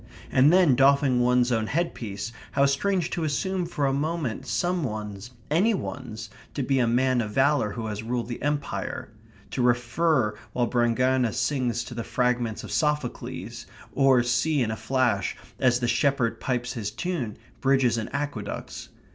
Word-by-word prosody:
And 135 +4 +5
then, 180 -6 +5
doffing 135 0 +4
one's 125 0 +3
own 110 -2 +1
headpiece, 115 - -3 0.2
how 140 0 +4
strange 175 +5 +1
to 170 - -2
assume 180 +4 -1
for 150 -4 -1
a 135 - +2
moment 150 -4 -2
some 175 -1 0
one's 105 -2 -5 0.2
any 200 +8 +3
one's 110 - -6 0.2
to 140 - -1
be 135 +1 +1
a 120 - +3
man 125 +1 +2
of 110 - -3
valour 135 -5 +2
who 115 - -5
has 105 -1 -4
ruled 120 +1 -2
the 120 - -6
Empire; 145 0 -3 0.4
to - - -1
refer 120 0 +2 0.2
while 125 - +1
Brangaena 125 +1 +2
sings 125 -4 0
to - - -9
the 115 -1 -4
fragments 125 -3 0
of - - -8
Sophocles, 150 -5 -2 0.3
or 135 -3 +4
see 135 +4 +1
in 110 - -1
a - - -2
flash, 130 +3 0 0.2
as 125 -1 +3
the 120 - 0
shepherd 120 -1 +1
pipes 125 0 -2
his 110 -5 -3
tune, 130 - -3 0.2
bridges 135 -4 +3
and 110 - -5
aqueducts. 140 -8 -5
125 Hz, 165 wpm, -26 LUFS, 120-145 Hz, 0.4 s, And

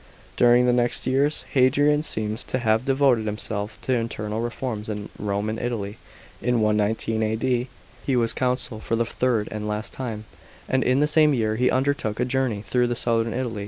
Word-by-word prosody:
During 120 0 +5
the 125 - +3
next 120 0 0
years, 140 +3 +1
Hadrian 145 +3 +3
seems 110 -6 -2
to - - -1
have 110 -1 +1
devoted 135 -5 +2
himself 105 0 -3
to 130 - 0
internal 110 -2 -2
reforms 115 -2 -4
in 105 -1 -5
Rome 100 0 -2
and 110 +1 -3
Italy. 110 -4 -3 0.4
In 125 -1 +1
119 110 +1 +1
A.D. 120 +3 0 0.4
he 135 - 0
was 115 -2 +2
consul 125 -3 -1
for 115 - -2
the 115 +1 +1
third, 115 -2 0
and 105 0 -4
last 105 0 -3
time, 110 -5 -5 0.4
and 130 0 +1
in 130 +3 +2
the - - +5
same 150 -1 +4
year 110 -2 0
he 125 +3 +2
undertook 130 -5 0
a 125 - +2
journey 125 -5 -1
through 125 +1 +1
southern 115 -1 +1
Italy. 120 -4 -3
120 Hz, 180 wpm, -24 LUFS, 110-130 Hz, 0.4 s, During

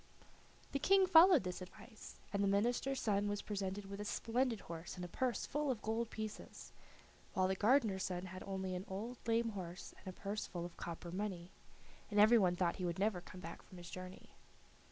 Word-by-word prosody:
The 275 - 0
King 385 +5 +5
followed 350 - +8
this 180 0 -4
advice, 215 +5 -11 0.2
and 200 0 +2
the - - +3
minister's 240 +6 +1
son 205 -1 +1
was 205 0 -2
presented 200 -1 -3
with 200 +1 -6
a - - -2
splendid 230 +1 0
horse 165 0 -7
and 180 -1 -5
a - - -5
purse 250 +7 -1
full 295 0 -1
of 240 -5 -1
gold 225 +1 -1
pieces, 215 -1 -7 0.6
while 185 0 +3
the 190 - +1
gardener's 215 -2 +3
son 180 0 -3
had 185 0 -8
only 190 -1 -3
an 180 +1 -4
old 220 +6 -5
lame 230 0 +2
horse 180 -4 -7
and - - -15
a 185 - -7
purse 205 +2 -3
full 175 -1 -4
of 175 - -8
copper 170 0 -6
money, 185 -2 -4 0.6
and 205 -1 +1
every 220 +3 +8
one 180 -3 +3
thought 175 -1 +1
he 185 - -2
would 170 - -2
never 195 -2 +1
come 180 +1 -11
back 165 -1 -7
from 185 - -14
his 175 -1 -9
journey. 185 0 -8
200 Hz, 205 wpm, -37 LUFS, 185-230 Hz, 0.6 s, followed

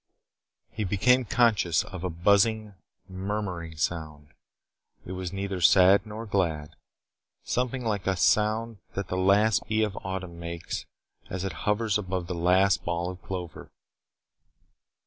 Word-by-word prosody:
He 110 - -3
became 125 +6 +3
conscious 105 -8 +2
of 90 -2 -8
a 90 - -1
buzzing, 100 +5 +2 0.3
murmuring 95 -4 -4
sound. 75 -3 -3 0.8
It - - -7
was 95 -1 -4
neither 95 -1 -4
sad 95 +4 +6
nor 110 +2 -6
glad. 85 -8 -1 0.7
Something 125 0 -2
like 105 -4 -1
the 95 - +1
sound 110 +4 +1 0.2
that 100 -2 -3
the - - -2
last 100 +3 +3
bee 110 0 +1
of 105 -3 -2
autumn 95 -2 -5
makes 85 0 -5 0.4
as 90 0 -4
it 95 -3 -3 0.2
hovers 105 0 +1
above 95 -3 -3
the 90 - -4
last 90 +3 +3
ball 85 +1 -2
of 90 - -12
clover. 90 -3 -7
95 Hz, 135 wpm, -27 LUFS, 90-105 Hz, 0.8 s, sad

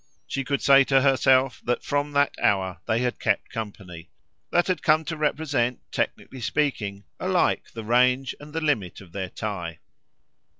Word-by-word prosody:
She 135 - -3
could 140 +1 -2
say 140 0 +7
to 135 0 +4
herself 130 -1 +3
that 120 - -1
from 145 0 -1
that 145 0 +3
hour 95 -3 +1
they 110 +2 +1
had 125 -1 -1
kept 105 -3 0
company: 95 -7 -7 0.4
that 175 - +3
had 185 -1 -1
come 155 +1 +3
to 165 - -3
represent, 145 -5 0
technically 130 - -3
speaking, 105 -4 -1 0.2
alike - - +1
the 115 - -5
range 125 +3 +2
and 150 +1 -11
the 165 +1 -3
limit 135 - -1
of 90 -4 -14
their 95 0 -4
tie. 90 -6 -5
125 Hz, 165 wpm, -25 LUFS, 100-145 Hz, 0.4 s, say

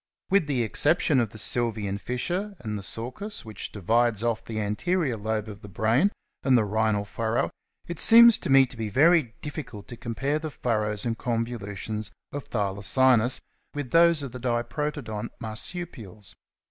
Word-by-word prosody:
With 195 -6 +3
the 130 -5 0
exception 145 +5 +2
of 115 -3 0
the 110 - -12
Sylvian 110 -3 +1
fissure 180 - -3
and 110 -3 -4
the 100 - -4
sulcus 125 - -4
which 110 -3 -7
divides 115 +2 +1
off 115 -2 -1
the 110 -1 -5
anterior 130 - -1
lobe 110 0 -3
of 105 -1 -9
the 105 - -11
brain 115 - +2 0.3
and 130 -2 +4
the 110 - +2
rhinal 105 0 0
furrow, 115 +2 -1 0.3
it 170 -2 -6
seems 235 0 +8
to - - -5
me 135 0 +7
to 125 - -11
be 110 -2 -4
very 145 - +3
difficult 125 -9 -7
to 120 - -8
compare 135 +7 -2
the 155 0 -5
furrows 110 -6 -1
and 115 -2 -2
convolutions 110 -3 -3 0.2
of 145 -1 -6
Thylacinus 115 +4 +2 0.3
with 145 -4 -4
those 165 -2 +4
of 135 - -6
the 125 - -8
Diprotodont 120 -1 -3
Marsupials. 110 - -5
120 Hz, 160 wpm, -26 LUFS, 110-140 Hz, 0.3 s, seems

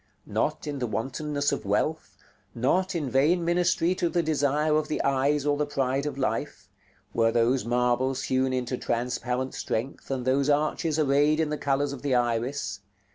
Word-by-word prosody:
Not - - -1
in 145 -2 -4
the 125 - -1
wantonness 145 +6 -2
of - - -2
wealth, - - -1 0.4
not 180 +11 +1
in 155 -5 -1
vain 155 +7 +2
ministry 175 0 +2
to 175 -2 0
the 175 -1 +1
desire 150 0 +1
of 155 0 +1
the 155 - -2
eyes 140 +1 +1
or 145 -1 +2
the 150 0 0
pride 135 0 -1
of 145 - -4
life, 130 - -2 0.5
were 115 0 +3
those 120 +2 +2
marbles 125 +2 +1
hewn 130 0 +1
into 125 0 -2
transparent 125 +2 -2
strength, 120 +5 -4
and 130 -2 -2
those 135 +2 +2
arches 150 +2 +1
arrayed 145 +1 +3
in 160 -2 +1
the - - 0
colors 140 0 0
of 140 - -8
the 140 -3 +1
iris. 120 -3 -1
140 Hz, 175 wpm, -27 LUFS, 125-150 Hz, 0.5 s, were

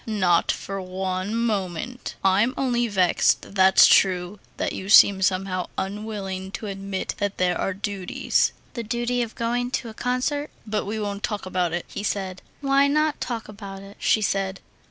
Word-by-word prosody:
"Not 185 -6 +2
for 195 0 -5
one 185 +2 -3
moment. 225 +1 -2
I'm 205 +7 +3
only 240 -3 +1
vexed, 190 -2 +2
that's 190 -1 +7
true, 185 +1 +3 0.2
that - - -1
you 190 - -6
seem 200 -2 +7
somehow 185 -1 0
unwilling 195 -2 -4
to - - -5
admit 195 -1 -4
that 205 -1 -2
there 180 -1 +2
are 195 - -2
duties...." 200 -2 0 0.2
"The 235 - -4
duty 240 +2 -1
of 230 -2 -4
going 240 +1 -1
to 245 -2 -3
a - - -9
concert...." 255 +5 -1 0.2
"But 215 -1 -2
we 215 +2 -3
won't 205 -1 -3
talk 210 -2 -3
about 180 -2 0
it," 175 +1 -3
he 205 - -6
said. 190 -3 -3 0.2
"Why 275 0 +4
not 305 +1 +1
talk 230 -3 -3
about 200 -2 -9
it?" 200 +1 -12
she 215 - +2
said. 195 -1 -1
200 Hz, 170 wpm, -24 LUFS, 190-230 Hz, 0.2 s, that's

